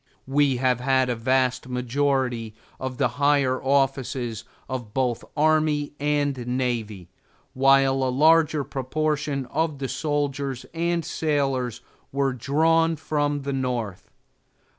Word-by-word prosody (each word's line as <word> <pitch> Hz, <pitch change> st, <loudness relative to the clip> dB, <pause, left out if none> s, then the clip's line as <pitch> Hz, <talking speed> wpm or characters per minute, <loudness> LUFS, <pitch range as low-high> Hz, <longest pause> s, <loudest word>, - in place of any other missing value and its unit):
We 135 Hz, -1 st, +2 dB
have 125 Hz, -1 st, +1 dB
had 130 Hz, 0 st, +2 dB
a -, -, -1 dB
vast 130 Hz, +2 st, +1 dB
majority 125 Hz, -3 st, -1 dB, 0.2 s
of 130 Hz, -1 st, -4 dB
the 135 Hz, -, +3 dB
higher 140 Hz, -3 st, +3 dB
offices 130 Hz, -4 st, 0 dB, 0.2 s
of 120 Hz, -5 st, -6 dB
both 125 Hz, -3 st, 0 dB
army 155 Hz, -1 st, +2 dB
and 145 Hz, -1 st, +1 dB
navy, 115 Hz, -7 st, -2 dB, 0.4 s
while 135 Hz, 0 st, +4 dB
a 130 Hz, -, +1 dB
larger 155 Hz, +2 st, +4 dB
proportion 145 Hz, +1 st, -2 dB
of 155 Hz, 0 st, 0 dB
the 135 Hz, -1 st, -3 dB
soldiers 140 Hz, -3 st, -2 dB
and 170 Hz, 0 st, -1 dB
sailors 135 Hz, -6 st, -1 dB, 0.3 s
were 135 Hz, -1 st, 0 dB
drawn 160 Hz, +6 st, +2 dB
from 145 Hz, -1 st, -1 dB
the 140 Hz, 0 st, -3 dB
North. 115 Hz, -7 st, -3 dB
135 Hz, 120 wpm, -24 LUFS, 125-145 Hz, 0.4 s, while